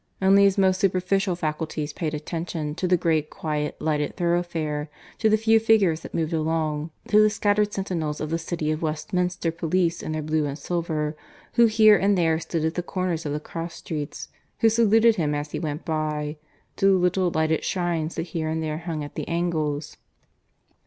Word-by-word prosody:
Only 195 Hz, +1 st, +5 dB
his 195 Hz, 0 st, +3 dB
most 190 Hz, -1 st, +3 dB
superficial 190 Hz, 0 st, +1 dB
faculties 155 Hz, -2 st, -3 dB
paid 155 Hz, -1 st, -3 dB
attention 160 Hz, 0 st, -4 dB
to 180 Hz, -, -2 dB
the 180 Hz, 0 st, +4 dB
great 160 Hz, -3 st, +1 dB
quiet 150 Hz, -1 st, -3 dB
lighted 150 Hz, -2 st, -1 dB
thoroughfare, 170 Hz, -4 st, -1 dB, 0.3 s
to 220 Hz, -, +3 dB
the 215 Hz, -, +4 dB
few 225 Hz, +1 st, +4 dB
figures 210 Hz, -8 st, +3 dB
that -, -, -9 dB
moved 165 Hz, 0 st, -1 dB
along, 155 Hz, -1 st, -1 dB, 0.2 s
to 210 Hz, 0 st, +6 dB
the 215 Hz, -, +5 dB
scattered 210 Hz, 0 st, +1 dB
sentinels 170 Hz, -7 st, -3 dB
of 155 Hz, 0 st, -4 dB
the 165 Hz, -, 0 dB
City 165 Hz, -2 st, -2 dB
of 155 Hz, -, -2 dB
Westminster 180 Hz, +2 st, -1 dB
police 170 Hz, +1 st, 0 dB
in -, -, -4 dB
their 155 Hz, -1 st, -2 dB
blue 155 Hz, 0 st, 0 dB
and 140 Hz, 0 st, -4 dB
silver, 160 Hz, -3 st, -2 dB, 0.4 s
who 235 Hz, -1 st, +6 dB
here 215 Hz, -1 st, +6 dB
and 200 Hz, +2 st, +3 dB
there 165 Hz, -2 st, +2 dB
stood 165 Hz, -1 st, -2 dB
at 160 Hz, -, 0 dB
the 175 Hz, -, -2 dB
corners 175 Hz, -3 st, -2 dB
of 145 Hz, -, -2 dB
the 150 Hz, -, -2 dB
cross 165 Hz, +2 st, -6 dB
streets, 150 Hz, -3 st, -6 dB, 0.3 s
who 225 Hz, -, +6 dB
saluted 225 Hz, 0 st, +4 dB
him 150 Hz, -4 st, 0 dB
as 145 Hz, +1 st, -4 dB
he -, -, -3 dB
went 155 Hz, -1 st, -4 dB
by; 155 Hz, -2 st, -2 dB, 0.4 s
to 195 Hz, -, +3 dB
the -, -, +6 dB
little 180 Hz, 0 st, +2 dB
lighted 160 Hz, -1 st, 0 dB
shrines 170 Hz, -3 st, -1 dB
that 165 Hz, -, -2 dB
here 160 Hz, -2 st, -1 dB
and 160 Hz, 0 st, -2 dB
there 155 Hz, 0 st, -3 dB
hung 165 Hz, -3 st, -4 dB
at 145 Hz, -, -8 dB
the -, -, -5 dB
angles. 160 Hz, -4 st, -2 dB
165 Hz, 195 wpm, -25 LUFS, 155-185 Hz, 0.4 s, to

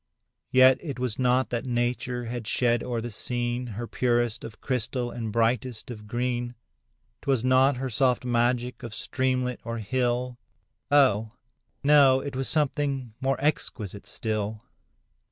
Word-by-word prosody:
Yet 130 Hz, 0 st, +6 dB
it 140 Hz, -7 st, -5 dB
was 125 Hz, -3 st, -2 dB
not 130 Hz, +1 st, +2 dB
that 120 Hz, +1 st, -2 dB
nature 120 Hz, 0 st, -1 dB
had 120 Hz, -1 st, -5 dB
shed 120 Hz, -2 st, +2 dB
o'er 120 Hz, -2 st, -2 dB
the 120 Hz, +1 st, -5 dB
scene 120 Hz, +2 st, -2 dB
Her 115 Hz, +1 st, -5 dB
purest 120 Hz, -1 st, 0 dB
of 110 Hz, -, -9 dB
crystal 125 Hz, -1 st, -2 dB
and 115 Hz, -2 st, -4 dB
brightest 115 Hz, +2 st, 0 dB
of 105 Hz, -2 st, -9 dB
green; 120 Hz, +1 st, -2 dB, 0.7 s
'Twas 135 Hz, -4 st, +1 dB
not 130 Hz, +1 st, +4 dB
her 130 Hz, +1 st, -2 dB
soft 125 Hz, +1 st, +2 dB
magic 120 Hz, +1 st, 0 dB
of 115 Hz, -3 st, -7 dB
streamlet 130 Hz, -2 st, -1 dB
or 115 Hz, 0 st, -4 dB
hill, 125 Hz, +2 st, -1 dB, 0.5 s
Oh! 115 Hz, -6 st, +4 dB, 0.5 s
no—it 140 Hz, -2 st, +5 dB
was 130 Hz, 0 st, 0 dB
something 140 Hz, -5 st, 0 dB
more 135 Hz, 0 st, +1 dB
exquisite 110 Hz, -, -2 dB
still. 110 Hz, -1 st, -3 dB
125 Hz, 135 wpm, -26 LUFS, 115-130 Hz, 0.7 s, Yet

